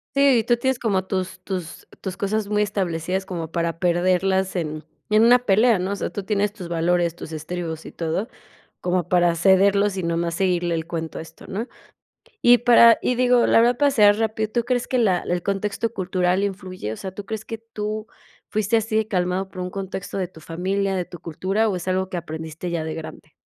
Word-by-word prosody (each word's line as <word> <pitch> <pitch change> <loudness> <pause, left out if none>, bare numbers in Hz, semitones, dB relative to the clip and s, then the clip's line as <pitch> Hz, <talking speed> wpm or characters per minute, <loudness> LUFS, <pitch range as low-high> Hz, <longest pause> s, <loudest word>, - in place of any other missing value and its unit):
Sí, 275 -3 +5
y 225 - 0
tú 240 +1 +2
tienes 265 +1 0
como 195 -6 0
tus 185 -1 -3
tus 180 -4 -6
tus 190 -1 -5
cosas 210 +1 -1
muy 210 0 +1
establecidas 190 -2 -1
como 165 -3 -5
para 170 -1 -2
perderlas 185 +2 +1
en 155 -2 -3 0.3
en 215 +1 +5
una 245 +2 +7
pelea, 225 0 +4
¿no?, 185 +2 -2
o - - -1
sea, - - -3
tú 200 - -5
tienes 205 0 0
tus 180 -5 -8
valores, 170 0 +1
tus 165 - -9
estribos 160 +1 -5
y - - -8
todo, 170 +6 -2 0.5
como 180 -1 -1
para 175 -2 +3
cederlos 195 +3 +4
y - - -1
nomás 170 0 -1
seguirle 175 -2 +1
el 160 0 -4
cuento 165 -2 -4
a - - -4
esto, 165 - -15
¿no?, 220 +6 -4 0.8
y 240 0 +7
para 235 -1 +7
y 250 - +1
digo, 250 -1 +4
la - - +6
verdad 240 +1 +4
para 285 +2 +3
cerrar 210 -5 +5
rápido, 220 -1 -1
¿tú 235 0 0
crees 245 0 0
que 255 -2 0
la 190 -6 +3
el 175 -1 -2
contexto 205 +3 -2
cultural 185 0 0
influye?, 185 - -5
o - - -6
sea, 190 - -6
¿tú 200 0 -8
crees 220 0 -5
que 225 - -6
tú 215 -1 -5 0.4
fuiste 215 +1 +1
así 220 0 +1
calmado 185 -1 -1
por 185 -1 -7
un 180 - -4
contexto 195 0 -5
de 185 -2 -1
tu 165 - -15
familia, 190 +4 -1
de 180 -1 -1
tu 175 - -11
cultura, 195 +7 -1
o 195 - -1
es 180 +1 -5
algo 185 0 0
que 180 - -3
aprendiste 160 +1 -6
ya 165 -2 -2
de 160 0 -4
grande? 155 -1 -9
190 Hz, 210 wpm, -23 LUFS, 175-215 Hz, 0.8 s, una